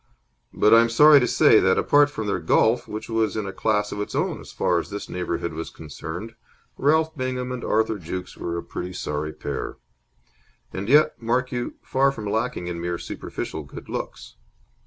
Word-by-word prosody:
But 105 - +4
I 115 - +9
am 115 - +2
sorry 150 +5 +7
to 125 - +1
say 110 - +5
that, 95 0 +3
apart 145 0 +4
from 145 -7 -5
their 100 -2 -1
golf, 110 +8 +2
which 105 +1 -6
was 115 -1 0
in 105 - -2
a 95 - -5
class 105 -1 0
of 105 - -3
its 105 - -5
own - - -1
as - - -12
far 85 - +1
as - - -6
this 100 0 -6
neighbourhood 90 -2 -3
was 80 +1 -5
concerned, 80 +7 -8 0.4
Ralph 160 +3 +2
Bingham 130 -2 -3
and 125 -1 -5
Arthur 110 -1 +1
Jukes 90 +2 -6
were 85 0 -4
a 90 +1 -6
sorry 75 -2 -3
pair - - -5 1.0
and 100 +3 -4
yet, 150 -1 +4
mark 125 +2 0
you, 120 -1 -3
far 135 +1 +2
from 110 -6 -7
lacking 110 -1 -1
in 85 -1 -4
mere 85 0 -2
superficial - - -6
good - - -11
looks. - - -6
110 Hz, 190 wpm, -24 LUFS, 90-125 Hz, 1.0 s, I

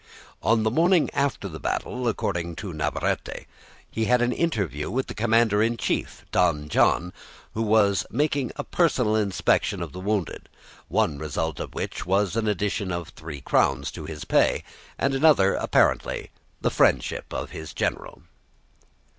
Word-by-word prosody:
On 115 -1 +3
the 110 - +1
morning 170 +5 +3
after 140 -7 0
the 80 -4 -8
battle, 125 +9 -2
according 85 -6 -2
to 90 +1 -6
Navarrete, 75 - -2 0.4
he 110 - -2
had 125 +2 +3
an 120 0 +2
interview 100 - -1
with 130 +2 -1
the - - -7
commander 110 -1 +3
in 115 +1 +1
chief, - - -2
Don 75 -4 +1
John, 90 +3 +2 0.4
who 110 - -2
was 105 -4 +3
making 140 -1 0
a 145 - -4
personal 130 -12 +2
inspection 100 -4 +1
of - - -5
the 90 - -8
wounded, 100 -3 -2 0.4
one 70 - 0
result 80 +1 -3
of - - -6
which - - -4
was 95 +2 +1
an 115 -1 0
addition 100 -1 -1
of 85 -2 -4
three 75 -3 -9
crowns 70 +1 +1
to 80 - -8
his 75 -1 -7
pay, - - +2 0.3
and 140 - +1
another, 135 -9 +5
apparently, - - +1 0.3
the - - +1
friendship - - +1
of - - -4
his 80 -1 -7
general. - - -3
105 Hz, 155 wpm, -25 LUFS, 85-120 Hz, 0.4 s, another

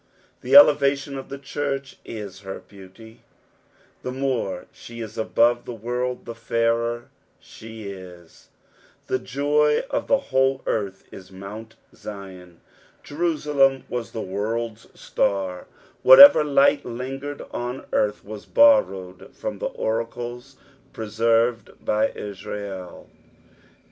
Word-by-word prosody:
The 130 +2 +1
elevation 140 -1 +6
of 135 - -7
the 140 - -6
church 140 -1 -4
is 100 -4 -8
her 95 -1 -7
beauty. 105 +4 -15 0.8
The 125 - -4
more 130 -8 -2
she 115 0 -12
is 110 -1 -7
above 120 +2 +2
tne 120 - -6
world 125 +2 -3
the 115 - -6
fairer 115 +1 -1 0.3
she 110 0 -11
is. 90 -4 -11 0.3
" - - -32
The 130 - -1
joy 150 +3 +1
^ - - -2
the 275 - +4
whole 135 - 0
earth 100 -3 -2
i* - - -8
Movnt 100 +4 -10 0.2
ZUm.'" 95 -4 -10 0.4
Jerusalem 145 -4 +1
was 120 -2 -4
the 110 - -5
world's 110 +4 -4
star; 95 -2 -1 0.3
whatever 155 +4 +10
light 140 0 +3
lingered 135 +4 -6
on 125 +2 -5
earth 105 0 0
was 105 0 -9
borrowed 95 - +3
from - - -5
the - - -2
oracles 120 +3 -4 0.4
preserved 115 +1 0 0.2
by 110 +1 +2
Israel. 100 -2 -7
115 Hz, 120 wpm, -23 LUFS, 105-135 Hz, 0.8 s, whatever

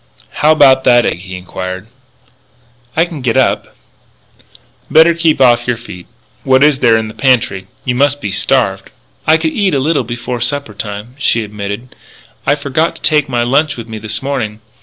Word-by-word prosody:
"How 150 - +5
about 135 -4 +5
that 120 -1 +5
egg?" - - -1
he 95 0 -8
inquired. 95 +1 -6 1.1
"I 165 - +4
can 165 -5 -8
get 125 -1 0
up 130 - 0 0.6
" - - -26 0.3
"Better 160 +2 +6
keep 165 -3 +1
off 120 -2 +4
your 125 -2 0
feet. 90 -6 -11 0.4
What 130 +1 +4
is 150 -2 +3
there 115 -4 +4
in 110 -1 -2
the 110 - -9
pantry? 110 -8 +1 0.2
You 125 - 0
must 145 +3 +1
be 100 -8 -4
starved." 100 - 0 0.4
"I 160 +1 +5
could 160 -1 -2
eat 195 -6 +1
a - - +1
little 145 0 +1
before 120 +1 -5
supper 125 -2 -2
time," 105 +3 -7
she 115 -5 +1
admitted. 105 +3 -7 0.5
"I - - +4
forgot 145 +3 -1
to - - -14
take 150 -2 +2
my 120 -2 0
lunch 140 +5 +1
with 115 -1 -8
me 110 -1 -7
this 110 +3 -4
morning. 120 -6 -3
125 Hz, 185 wpm, -14 LUFS, 110-145 Hz, 1.1 s, Better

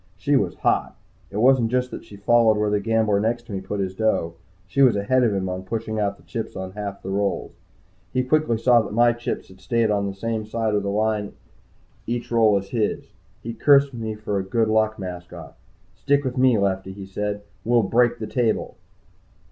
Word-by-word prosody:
She 140 +9 +1
was 95 -9 +1
hot. - - 0 0.3
It 100 - -6
wasn't 125 0 +4
just 125 +1 0
that - - -7
she 100 - -13
followed 110 +2 +3
where 105 0 0
the 105 - +2
gambler 110 -1 +1
next 115 +3 -1
to 115 - -11
me 95 -1 -3
put 105 +1 -4
his 95 -1 -2
dough 95 -5 0 0.3
she 120 +8 -1
was 125 -5 +6
ahead 125 +6 +2
of 115 - +3
him 95 -1 -1
on 90 0 -3
pushing 110 +2 -4
out 100 -1 -1
the 85 - -21
chips 100 +7 -5
on 95 -1 -5
half 100 0 -6
the 95 - -4
rolls. 100 0 -1 0.6
He 130 0 +1
quickly 130 -3 +1
saw 120 +1 +4
that 105 -1 -6
my 120 +1 +5
chips 120 +1 -5
had 95 0 -17
stayed 115 -2 +1
on 100 -1 0
the 100 - -5
same 110 +1 -3
side 110 -1 -1
of 105 - +2
the 100 - -3
line 105 0 -1 0.7
each 120 0 -3
roll 110 -3 +4
as 100 0 -5
his. 110 -4 -2 0.3
He 115 - -5
cursed 140 +1 +4
me 110 -2 -4
for 105 -2 -2
a - - -2
good 110 +3 0
luck 110 0 +2
mascot. 90 -4 -8 0.4
"Stick 140 +8 +1
with 130 -2 -3
me, 130 -3 +4
Lefty," 95 -1 -1
he 100 0 -8
said. 105 +1 -4 0.2
"We'll 120 0 +3
break 120 +4 +2
the 110 - -5
table!" 115 +1 -1
110 Hz, 210 wpm, -23 LUFS, 100-120 Hz, 0.7 s, was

